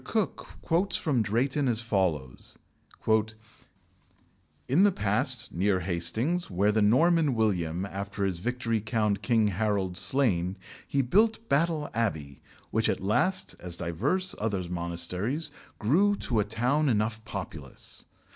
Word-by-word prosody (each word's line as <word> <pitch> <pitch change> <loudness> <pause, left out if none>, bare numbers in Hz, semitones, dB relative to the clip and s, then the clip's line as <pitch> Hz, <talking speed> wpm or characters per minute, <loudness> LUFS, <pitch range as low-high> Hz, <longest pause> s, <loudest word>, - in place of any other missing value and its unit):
Cooke 220 -3 -2 0.2
quotes 175 +4 +1
from 140 -8 +1
Drayton 130 +7 0
as 115 -3 +2
follows: 95 - -2 2.1
"In 145 +8 +3
the 205 0 +6
plain, 105 - 0 0.3
near 95 +1 +1
Hastings, 110 - -1
where 100 +3 +2
the 110 +1 +2
Norman 150 +6 +4
William, 90 -5 0
after 100 +1 -4
his 90 -3 -2
victory 115 +1 -1
found 105 -2 0
King 110 +1 +2
Harold 100 -2 -1
slain, 95 -3 +1 0.3
he 140 -1 +1
built 220 - +2
Battle 155 0 +2
Abbey, 80 - -2 0.3
which - - +2
at - - 0
last, 110 - 0
as 90 -2 -3
divers 130 - -1
other 100 -5 -1
monasteries, 90 - -1 0.3
grew 185 - +3
to 120 - -1
a 105 - +2
town 125 +8 +1
enough 110 0 0
populous. 80 -10 -7
110 Hz, 130 wpm, -28 LUFS, 95-140 Hz, 2.1 s, the